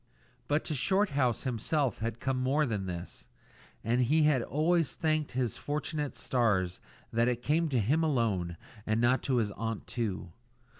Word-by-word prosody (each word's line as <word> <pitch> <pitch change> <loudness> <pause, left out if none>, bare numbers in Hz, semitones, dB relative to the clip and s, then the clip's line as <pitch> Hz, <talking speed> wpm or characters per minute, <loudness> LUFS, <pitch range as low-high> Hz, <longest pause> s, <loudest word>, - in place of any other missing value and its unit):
But 145 +2 +1
to - - -2
Shorthouse 145 - +1
himself 130 +1 0
had 115 +1 -3
come 135 -1 -1
more 140 +4 +2
than 105 -6 -2
this, 85 -1 -7 0.6
and 120 +3 +2
he 150 +6 +3
has 150 -4 +4
always 160 +4 +1
thanked 155 -3 0
his 125 -3 -1
fortunate 150 0 -3
stars 100 -8 +1 0.3
that 115 +1 +3
it 120 -1 -1
came 160 +2 +2
to 130 - +1
him 135 +10 +2
alone 105 - 0 0.3
and 110 +1 +1
not 120 +2 +3
to 130 - 0
his 110 -4 +1
aunt 115 +1 -4
too. 100 -7 -3
125 Hz, 160 wpm, -30 LUFS, 115-150 Hz, 0.6 s, has